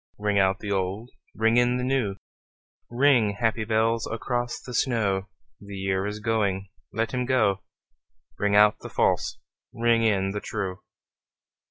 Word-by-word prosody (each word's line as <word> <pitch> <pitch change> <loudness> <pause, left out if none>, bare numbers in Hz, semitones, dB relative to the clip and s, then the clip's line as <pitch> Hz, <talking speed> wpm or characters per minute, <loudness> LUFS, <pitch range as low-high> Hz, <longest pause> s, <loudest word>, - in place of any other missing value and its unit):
Ring 105 -1 +1
out 95 0 +3
the 105 - -4
old, 100 +5 -2 0.2
ring 115 +1 +2
in 120 0 +3
the 125 - -2
new, 125 -7 0 0.7
Ring, 120 -5 +3
happy 115 -1 +1
bells, 115 +1 +1
across 120 +1 -3
the 125 - -10
snow: 105 -6 0 0.3
The 100 0 -10
year 95 0 -1
is 105 +1 -5
going, 100 -3 -1 0.2
let 115 +3 -2
him 125 -1 0
go; 100 -7 +2 0.8
Ring 105 0 +1
out 105 0 +5
the - - -9
false, - - +1 0.3
ring 115 -1 +2
in 100 -4 +1
the 105 - -3
true. 100 -3 -4
110 Hz, 150 wpm, -26 LUFS, 100-120 Hz, 0.8 s, out